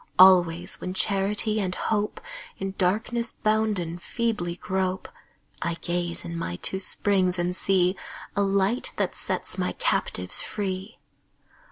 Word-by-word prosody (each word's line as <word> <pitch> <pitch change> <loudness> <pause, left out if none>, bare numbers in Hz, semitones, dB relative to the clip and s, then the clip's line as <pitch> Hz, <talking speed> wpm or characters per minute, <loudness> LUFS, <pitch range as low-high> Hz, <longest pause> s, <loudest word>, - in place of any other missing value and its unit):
Always 175 -2 +5
when 185 +1 -4
Charity 205 +3 +2
and 185 -2 -1
Hope, 210 -1 -1 0.4
In 195 0 -4
darkness 225 +5 0
bounden, 210 -6 0
feebly 210 -3 -2
grope, 185 0 -2 0.5
I 170 -1 -1
gaze 175 0 -2
in 170 0 -5
my 125 - -3
two 190 - -1
springs 185 -1 +3
and 175 +1 -1
see 185 -1 +2 0.4
A 200 - +2
Light 200 +4 +1
that - - 0
sets - - -3
my - - 0
captives - - 0
free. 195 +1 -4
190 Hz, 130 wpm, -26 LUFS, 175-205 Hz, 0.5 s, Always